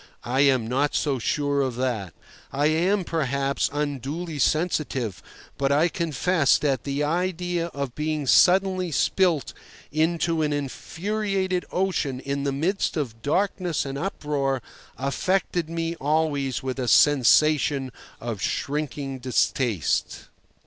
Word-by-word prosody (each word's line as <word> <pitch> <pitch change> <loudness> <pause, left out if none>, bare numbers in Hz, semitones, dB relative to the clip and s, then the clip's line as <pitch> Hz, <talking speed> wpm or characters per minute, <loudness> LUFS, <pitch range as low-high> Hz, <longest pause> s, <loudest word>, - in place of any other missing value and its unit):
I 125 +3 0
am 130 -5 +4
not 135 +5 0
so 140 -4 0
sure 145 +4 0
of 130 -3 -1
that. 115 -8 -2 0.4
I 140 +2 0
am, 180 +6 +2
perhaps, 140 -4 0
unduly 145 +3 -3
sensitive, 140 - 0 0.4
but 140 0 +1
I 155 +5 +3
confess 165 -1 +2
that 135 -5 -1
the 140 +1 -1
idea 175 +1 -1
of 140 -6 -5
being 150 0 -2
suddenly 185 +4 +4
spilt 170 0 +1 0.4
into 165 +1 +1
an 150 -1 +1
infuriated 185 +6 -2
ocean 175 -8 -1
in 140 +1 -3
the 140 - +1
midst 170 +7 -1
of 115 -7 -4
darkness 180 - 0
and 135 0 -5
uproar 140 -5 -2 0.3
affected 170 +4 -1
me 165 0 -2
always 145 -4 0
with 130 0 -3
a 125 - -2
sensation 145 0 +4 0.3
of 115 -4 -5
shrinking 140 -2 -3
distaste. 125 - 0
145 Hz, 120 wpm, -25 LUFS, 135-170 Hz, 0.4 s, am